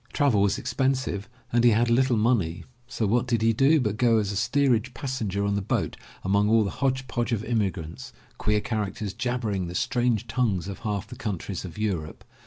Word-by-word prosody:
Travel 140 -9 +3
was 100 -1 +2
expensive 130 -4 -1 0.2
and 120 0 +3
he 120 - +7
had 115 +2 +3
little 125 0 +3
money, 105 -7 +1 0.2
so 120 -2 -2
what 120 +4 +1
did 115 -2 +1
he 115 0 +4
do 140 +7 +4
but 105 -5 -1
go 115 -2 +4
as 105 -2 0
a - - -4
steerage 125 +2 +1
passenger 110 -7 -2
on 100 - 0
the 100 - 0
boat 100 - -1 0.3
among 100 +2 +2
all 110 0 +5
the 100 - -2
hodge 130 -1 -1
podge 120 +1 -2
of 110 -2 0
immigrants 95 - -2
— - - -31
queer 105 0 +1
characters, 105 -2 -3
jabbering 115 -6 -2
the 90 - -7
strange 120 +2 +1
tongues 105 -9 0
of 100 - -6
half 105 -2 -2
the 125 - -10
countries 100 -6 -4
of 85 0 -9
Europe. 90 -8 -3
110 Hz, 200 wpm, -26 LUFS, 100-125 Hz, 0.3 s, he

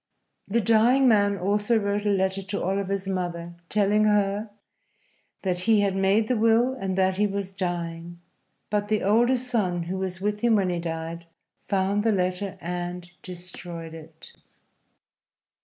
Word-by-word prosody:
The 230 +4 +1
dying 230 +5 +4
man 205 -3 +3
also 205 +5 +1
wrote 205 0 -1
a - - +3
letter 190 -1 +1
to 200 +1 -4
Oliver's 195 +1 -1
mother, 175 -2 -3 0.2
telling 210 +1 +3
her 210 0 +1 0.9
that 180 -2 0
he 215 -2 +5
had 200 -1 +1
made 195 +3 +2
the 250 - +1
will 230 +3 +3
and 195 -7 -3
that 190 0 +2
he 210 +1 +3
was 200 -1 -4
dying; 175 -2 -4 0.5
but 205 -1 0
the 215 0 0
older 235 +6 +3
son, 215 -9 -1
who 185 +3 -4
was 185 -1 -4
with 210 +1 -1
him 235 0 +3
when 190 -3 +1
he 175 - -2
died, 165 0 -5 0.4
found 200 +1 +1
the 225 - +3
letter 185 0 -1
and 175 0 -5
destroyed 175 -2 -8
it. 160 0 -12
195 Hz, 155 wpm, -25 LUFS, 180-210 Hz, 0.9 s, he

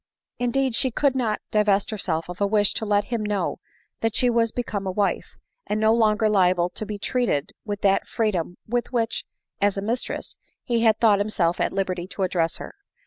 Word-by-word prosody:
Indeed 255 +1 +1
she 260 +3 +2
could 275 +3 +1
not 230 -5 0
divest 210 -1 +2
herself 170 -6 -2
of 180 +2 -8
a 200 - +3
wish 205 -1 +3
to 220 - -3
let 205 0 +3
him 230 - 0
know 210 -2 -1 0.4
that 225 -1 -1
she 250 -1 +4
was 230 -1 +2
become 210 -5 -3
a - - 0
wife, 200 +1 -1 0.3
and 210 - -1
no 220 +1 +4
longer 220 -1 +3
liable 180 -4 +3
to 215 - -5
be 210 - -4
treated 200 - -1
with 205 -1 -4
that 195 -1 +2
freedom 185 -6 -1
with 240 +2 -1
which, 230 -3 -1 0.4
as 205 0 +2
a - - -1
mistress, 235 +4 -3 0.2
he 235 -1 0
had 220 -2 +4
thought 210 -3 +5
himself 190 -5 0
at - - +1
liberty 185 -2 -2
to 195 0 -4
address 170 -3 0
her. - - -8
210 Hz, 195 wpm, -24 LUFS, 195-230 Hz, 0.4 s, thought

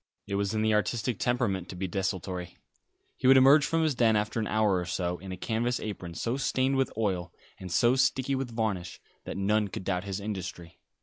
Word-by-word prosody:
It - - -6
was 100 +1 0
in 110 - +1
the 110 0 +3
artistic 110 +1 0
temperament 115 -7 0
to - - -7
be 95 +1 -3
desultory. 90 -1 -3 0.6
He - - 0
would 135 0 +8
emerge 135 +2 +6
from 165 0 +1
his 155 -2 +2
den 115 -3 +3
after 105 +2 0
an 110 - -1
hour 105 -3 +2
or 90 - -3
so, 90 0 -2
in 95 0 -8
a 90 - -5
canvas 120 +5 -1
apron 90 -5 -6
so 115 +10 -1
stained 135 0 +1
with 135 - +1
oil, 95 -6 -1 0.3
and 90 -1 -7
so 120 +7 +4
sticky 130 +1 +1
with 135 -1 -2
varnish, 100 -6 -2 0.3
that - - -5
none 105 +2 +2
could 95 - -6
doubt 90 0 -1
his 100 0 -3
industry. 90 -5 -6
105 Hz, 210 wpm, -28 LUFS, 95-120 Hz, 0.6 s, would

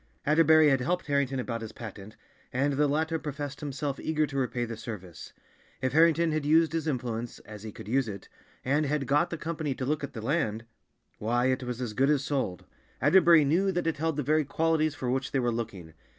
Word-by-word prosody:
Atterbury 155 0 +6
had 135 -2 +2
helped 180 +7 -1
Harrington 140 -2 0
about 115 -2 -3
his 110 - -7
patent, 105 -2 -9 0.4
and 140 +3 +1
the 145 +2 +2
latter 160 +3 0
professed 145 -2 -5
himself 145 -1 -4
eager 155 -1 0
to 140 - -9
repay 125 -2 -1
the 115 0 -6
service. 105 -6 -8 0.5
If 130 0 -1
Harrington 165 +1 +4
had 155 -1 -1
used 160 +1 +3
his 165 -1 -2
influence—as 115 -5 -4
he 110 0 -7
could - - -11
use 130 +2 +1
it—and 130 +8 -4
had 145 -1 -1
got 145 +6 +2
the 165 - -4
company 155 -3 -3
to 130 - -4
look 145 +2 -1
at 140 - -5
the 110 - -6
land, 115 -5 -1 0.5
why, 120 +4 +1
it 130 - -1
was 125 -1 -4
as 120 -4 -3
good 135 +5 +2
as 145 -2 +2
sold. 130 - -2 0.3
Atterbury 165 +2 +6
knew 180 +7 +2
that 175 -2 -2
it 165 -2 0
held 160 0 -1
the 150 - 0
very 155 +3 +2
qualities 155 +1 +1
for 125 -3 -2
which 130 +1 -1
they 135 - +2
were 120 -1 +1
looking. 100 -8 -5
140 Hz, 210 wpm, -28 LUFS, 120-155 Hz, 0.5 s, Atterbury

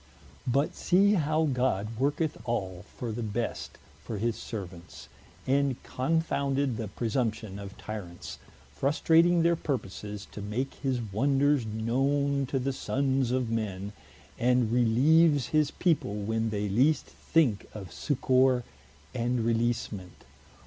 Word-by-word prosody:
But 135 +4 +1
see 200 +3 +3
how 155 -3 +2
God 120 -5 0
worketh 145 +3 0
all 95 -5 -3
for 120 -2 -3
the 115 +2 -4
best 115 +1 -3 0.3
for 110 - -5
his 115 +2 0
servants, 95 -6 -8 0.4
and 140 0 +2
confounded 140 -2 0
the 110 - -3
presumption 110 -2 -2
of 100 -1 -9
Tyrants, 95 -5 -7 0.3
frustrating 165 +4 +3
their 170 0 +4
purposes, 105 - -4
to 105 - -7
make 110 +7 -3
his 130 -3 -2
wonders 140 +2 +2
knowne 135 +5 0
to 135 - -1
the 135 +1 0
sonnes 135 -1 0
of 125 -3 0
men, 100 -3 -3 0.5
and 125 -2 +3
releeves 135 +4 +4
his 155 -2 +3
people, 160 - 0
when 110 +2 -1
they 105 -1 -2
least 135 +9 +3
thinke 135 -11 0
of 95 -5 -8
succour 130 -3 +2 0.5
and 120 +1 0
releasement. 115 -5 -2
125 Hz, 125 wpm, -29 LUFS, 110-140 Hz, 0.5 s, their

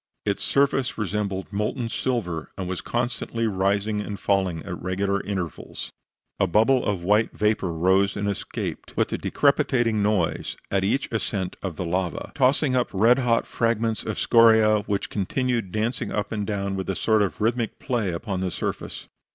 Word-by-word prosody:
Its 100 -1 0
surface 140 -2 +1
resembled 100 -1 -2
molten 105 +4 -1
silver, 105 -10 -2
and 95 - -3
was 90 -1 -3
constantly 120 -1 -2
rising 100 +1 0
and 105 -1 -5
falling 95 -5 0
at 90 -3 -6
regular 100 +2 0
intervals. 90 -6 -5 0.5
A 95 - +3
bubble 115 +8 +3
of 100 -4 -1
white 105 +4 +2
vapor 105 -4 +1
rose 95 +4 +2
and 100 0 -1
escaped, 100 - -4
with - - +1
a - - -1
decrepitating 125 -6 +2
noise, 100 -5 0
at 95 -1 +2
each 130 +8 +1
ascent 100 -4 -2
of 95 -4 -4
the 90 - -3
lava 90 +1 -2
tossing 135 0 +3
up 125 -1 +1
red 115 +6 +4
hot 120 -3 +2
fragments 115 -1 0
of 110 - -4
scoria, 110 -2 +5
which 100 -2 -1
continued 115 0 -1
dancing 110 +4 -1
up 105 -1 -2
and 105 -2 -2
down 100 -2 -2
with 95 0 -4
a 95 - 0
sort 110 -1 +2
of 100 - -1
rhythmic 115 +1 0
play 120 -8 -1
upon 95 +2 -3
the 95 0 -1
surface. - - -4
105 Hz, 170 wpm, -25 LUFS, 95-115 Hz, 0.5 s, scoria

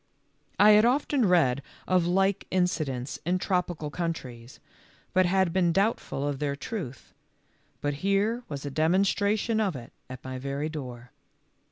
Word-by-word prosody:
I 210 +1 +8
had 210 0 +7
often 260 -1 +2
read 140 -8 +3 0.3
of 180 -2 +2
like 195 +2 +1
incidents 155 -8 -1
in 180 +3 +1
tropical 180 -5 -2
countries, 130 -8 -5 0.5
but 185 -1 +4
had 190 -2 +2
been 180 -2 +3
doubtful 195 -7 0
of 140 -2 -3
their 145 -1 -1
truth, 140 - -7 0.7
but 145 0 0
here 200 +5 +1
was 140 -1 -5
a 145 - -4
demonstration 200 - +1
of 195 -7 0
it 120 -2 -9 0.2
at 130 -1 -9
my 130 0 -5
very 140 +3 -3
door. 125 -5 -8
175 Hz, 145 wpm, -27 LUFS, 140-195 Hz, 0.7 s, I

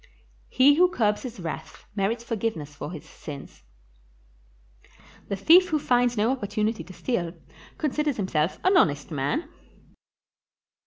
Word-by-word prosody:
He 270 +3 +6
who 355 +4 +5
curbs 210 -10 +1
his 245 -5 -7
wrath 165 -3 -7
merits 220 +4 -1
forgiveness 220 -11 -3
for 145 - -6
his 160 -5 -9
sins. 140 - -10 1.7
The 200 - -2
thief 345 - +6
who 310 - +2
finds 245 -4 +2
no 220 +4 +3
opportunity 215 -2 -1
to 185 - -13
steal, 175 -7 -2 0.4
considers 300 -2 -1
himself 175 -4 0
an 375 +1 +4
honest 145 - +2
man. 155 - -1
220 Hz, 125 wpm, -26 LUFS, 175-265 Hz, 1.7 s, He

